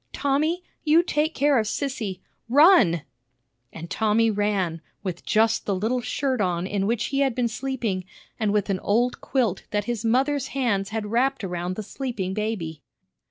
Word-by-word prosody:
Tommy? 305 +6 0 0.2
you 320 +2 +5
take 315 -1 0
care 285 -2 +3
of 215 - -1
Sissy! 220 -8 -3 0.3
Run!" 265 - +6 0.7
And 165 +1 -8
Tommy 220 +4 +2
ran, 200 -6 0 0.2
with 180 -3 -4
just 225 +1 +2
the 200 - +1
little 225 +6 0
shirt 260 -1 -1
on 175 -2 0
in 195 0 -1
which 230 0 0
he 275 - +2
had 270 -4 +2
been 250 -2 +1
sleeping, 230 -6 -3 0.3
and 215 -2 +1
with 205 -1 +1
an 190 - -1
old 240 +6 +1
quilt 230 -8 0
that 205 -1 -1
his 240 -2 -3
mother's 265 +4 +1
hands 205 -7 +1
had 220 0 -3
wrapped 260 +1 +1
around 180 -1 -3
the 215 - -4
sleeping 210 -4 -4
baby. 190 -8 -3
220 Hz, 165 wpm, -24 LUFS, 195-265 Hz, 0.7 s, Run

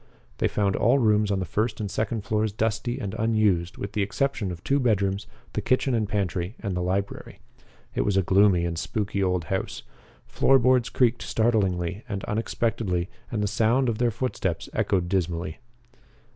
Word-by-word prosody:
They - - +3
found 100 -2 0
all 120 +6 +4
rooms 105 -4 +3
on 100 - +1
the 95 - -2
first 110 +6 -1
and 105 -3 -3
second 110 0 -2
floors 110 +1 0
dusty 115 +3 -1
and 100 -2 -4
unused 105 -6 +1
with 100 - -5
the 105 - -1
exception 105 -1 -1
of 85 +1 -8
two 140 +5 +2
bedrooms, 100 -5 +1 0.3
the - - -1
kitchen 130 +1 +1
and 110 -3 0
pantry, 95 -1 -2
and 100 -5 -3
the 90 - -1
library. 95 +2 -3 0.6
It - - 0
was 100 -2 +1
a 95 - +3
gloomy 95 -1 +4
and 85 -1 -2
spooky 100 -1 -2
old 90 -2 +1
house. 95 +5 -3 0.4
Floor 135 - +4
boards 125 -1 +3
creaked 120 -2 +2
startlingly 100 -4 0
and 100 -2 -3
unexpectedly 105 -4 -1 0.2
and 110 -3 -1
the - - +1
sound 115 +5 +2
of 110 - -2
their 120 -1 +3
footsteps 100 -7 -2
echoed 90 -3 +1
dismally. 85 -3 -2
105 Hz, 175 wpm, -26 LUFS, 95-115 Hz, 0.6 s, all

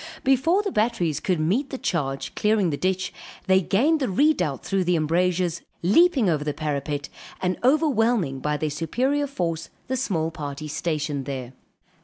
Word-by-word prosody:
Before 280 +9 +3
the 400 - -2
batteries 210 - 0
could 180 -4 0
meet 205 - +1
the 265 - -4
charge, 135 - -2
clearing 210 -5 +2
the - - -1
ditch, 185 +3 -1 0.3
they 190 0 +4
gained 275 - +2
the 265 - -1
redoubt 190 - +1
through 195 -1 +1
the 180 0 +2
embrasures, 170 +2 +1 0.2
leaping 265 - +4
over 155 -4 +1
the 150 -1 -2
parapet, 145 -1 -3 0.3
and 180 0 0
overwhelming 240 - +2
by 150 +2 -1
their 155 0 -2
superior 260 - 0
force 165 - -3 0.2
the 260 - 0
small 170 -11 -1
party 150 -2 -6
stationed 150 -2 -2
there. 130 -2 -5
180 Hz, 160 wpm, -24 LUFS, 150-245 Hz, 0.3 s, they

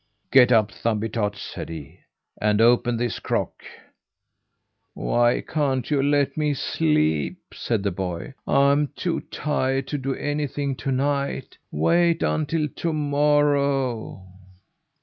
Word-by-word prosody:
"Get 125 -2 +6
up, 110 -3 +4
Thumbietot," 110 -2 -1
said 100 - -7
he, 80 +1 -9 0.4
"and 105 0 +2
open 120 +1 +4
this 120 -1 -2
crock!" - - -2 1.3
"Why 120 - +2
can't 140 -3 -1
you 145 -2 +3
let 140 -1 +1
me 150 -2 0
sleep?" 80 - 0 0.2
said 110 -5 -2
the 100 - 0
boy. 90 +6 -5
"I'm 140 +1 +3
too 175 -2 -1
tired 135 -2 -1
to 145 - -2
do 135 0 -2
anything 145 -1 -2
to 135 - -3
night. 140 +1 -2
Wait 170 - +2
until 155 0 0
to 165 +4 -3
morrow!" 145 -7 +1
135 Hz, 120 wpm, -24 LUFS, 110-145 Hz, 1.3 s, Get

